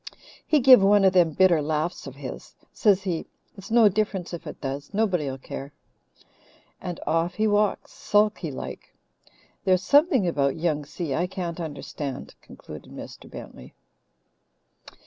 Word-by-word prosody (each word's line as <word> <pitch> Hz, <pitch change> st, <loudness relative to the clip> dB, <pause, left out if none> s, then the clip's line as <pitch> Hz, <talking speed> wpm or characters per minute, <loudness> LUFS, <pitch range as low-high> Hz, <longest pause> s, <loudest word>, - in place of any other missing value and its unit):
"He 305 Hz, -3 st, +3 dB
give 255 Hz, -3 st, +8 dB
one 200 Hz, 0 st, +5 dB
of 190 Hz, -, +4 dB
them 175 Hz, -3 st, +5 dB
bitter 175 Hz, -2 st, +4 dB
laughs 155 Hz, +1 st, -2 dB
of 135 Hz, -, -9 dB
his. 140 Hz, -2 st, -9 dB, 0.2 s
Says 200 Hz, -3 st, +3 dB
he: 175 Hz, -4 st, -3 dB, 0.3 s
'It's 195 Hz, -1 st, -11 dB
no 230 Hz, -1 st, +6 dB
difference 200 Hz, -3 st, -1 dB
if 170 Hz, -1 st, -7 dB
it -, -, -8 dB
does. 140 Hz, +1 st, -5 dB
Nobody'll 180 Hz, -11 st, 0 dB
care,' 135 Hz, +1 st, -8 dB, 1.1 s
and 180 Hz, -2 st, -5 dB
off 165 Hz, +2 st, 0 dB
he 220 Hz, -, +1 dB
walks, 210 Hz, -1 st, +1 dB
sulky 210 Hz, -5 st, +1 dB
like. 135 Hz, -, -8 dB, 0.7 s
There's 185 Hz, -1 st, +2 dB
something 285 Hz, -, +4 dB
about 140 Hz, -5 st, +1 dB
Young 155 Hz, -3 st, -1 dB
Si 155 Hz, -1 st, -4 dB
I 175 Hz, +6 st, 0 dB
can't 180 Hz, -3 st, -5 dB
understand," 145 Hz, -3 st, -6 dB
concluded -, -, -12 dB
Mr. -, -, -10 dB
Bentley. -, -, -11 dB
175 Hz, 145 wpm, -25 LUFS, 150-205 Hz, 1.1 s, give